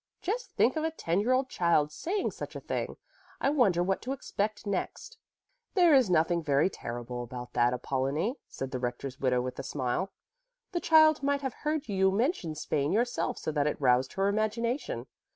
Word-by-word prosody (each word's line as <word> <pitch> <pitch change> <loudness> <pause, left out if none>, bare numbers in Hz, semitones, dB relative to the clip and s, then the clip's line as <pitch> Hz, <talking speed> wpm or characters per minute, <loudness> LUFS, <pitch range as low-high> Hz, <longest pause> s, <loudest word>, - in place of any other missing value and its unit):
Just 465 +6 -3
think - - +3
of 315 - -1
a 320 - +1
ten 180 - -1
year 225 +5 +1
old 260 +1 +2
child 170 - +2
saying 370 - -2
such - - -8
a - - -4
thing. - - -4 0.4
I 275 - +2
wonder 200 - +3
what 190 +1 0
to 260 - -3
expect 215 -5 -3
next." 450 - -4 0.6
"There 350 -4 +6
is 260 -7 +5
nothing 170 0 +3
very 145 +4 +2
terrible 120 +1 -5
about 125 0 -7
that, 120 0 +3
Apollonie," 140 - -1
said 135 0 -6
the 130 - -3
rector's 125 +2 -4
widow 125 -2 +2
with 125 - -5
a - - -3
smile. 140 +8 -2 0.6
"The 345 -2 -1
child 315 -2 +6
might 280 0 +1
have 265 -2 -3
heard 305 0 -2
you 190 -2 +3
mention 200 - 0
Spain 145 -1 -1
yourself 240 +4 0
so - - -3
that 150 -1 +1
it 150 - -2
roused 130 -1 +3
her 195 +1 +1
imagination. 225 +5 -1
190 Hz, 190 wpm, -29 LUFS, -, 0.6 s, There